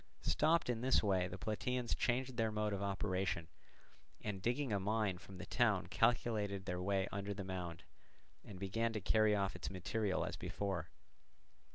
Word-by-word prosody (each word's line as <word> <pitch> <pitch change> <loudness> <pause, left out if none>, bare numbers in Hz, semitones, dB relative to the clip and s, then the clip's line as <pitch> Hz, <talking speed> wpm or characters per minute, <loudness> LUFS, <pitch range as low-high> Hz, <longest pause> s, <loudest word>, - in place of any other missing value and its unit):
Stopped 165 +2 +3
in 120 -2 0
this 130 -1 +4
way 95 -3 +2
the 90 - -6
Plataeans 120 +3 -1
changed 130 0 0
their 115 -2 +1
mode 105 -1 0
of 100 - -2
operation, 95 -4 -1 0.7
and 100 -3 -4
digging 120 +2 0
a 100 - +2
mine 105 -2 0
from 95 0 -11
the 90 - -6
town 110 -6 +2
calculated 105 -5 +2
their 90 -1 -2
way 95 +1 +1
under 100 +1 -3
the 100 - -4
mound, 90 -3 -5 0.6
and 100 - -9
began 115 +5 0
to 110 - -1
carry 110 +1 +4
off 100 -1 0
its - - -4
material 100 +1 -1
as - - -4
before. 95 -5 -3
100 Hz, 170 wpm, -38 LUFS, 95-115 Hz, 0.7 s, this